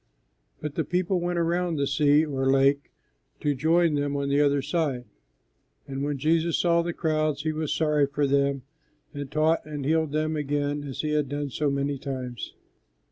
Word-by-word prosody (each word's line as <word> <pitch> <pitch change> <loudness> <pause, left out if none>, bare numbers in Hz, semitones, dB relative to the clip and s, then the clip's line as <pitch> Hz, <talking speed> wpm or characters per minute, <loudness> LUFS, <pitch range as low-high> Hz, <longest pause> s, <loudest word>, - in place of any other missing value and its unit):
But 150 -2 -4
the 160 - -1
people 180 +2 0
went 175 0 -2
around 170 0 0
the 140 -2 0
sea, 145 +2 +3
or 135 -3 -1
lake, 135 +1 +3 0.5
to 145 - +1
join 160 +4 +2
them 145 -1 -1
on 140 0 -1
the 140 +1 +3
other 140 -1 +2
side; 145 -4 -1 0.8
and 135 0 -4
when 145 0 -1
Jesus 160 +3 +1
saw 170 -1 +3
the 170 +1 -2
crowds 155 -3 -1
He 155 - 0
was 155 -1 -3
sorry 150 -1 +2
for 145 +1 0
them, 140 -1 +1 0.5
and 145 -2 -6
taught 155 +3 +2
and 150 -3 -6
healed 160 0 +1
them 155 +1 0
again 145 0 -1
as 135 -2 -4
He 155 - -2
had 150 -3 0
done 145 -1 -3
so 150 +3 0
many 140 0 -1
times. 130 -4 -6
145 Hz, 185 wpm, -26 LUFS, 140-160 Hz, 0.8 s, sea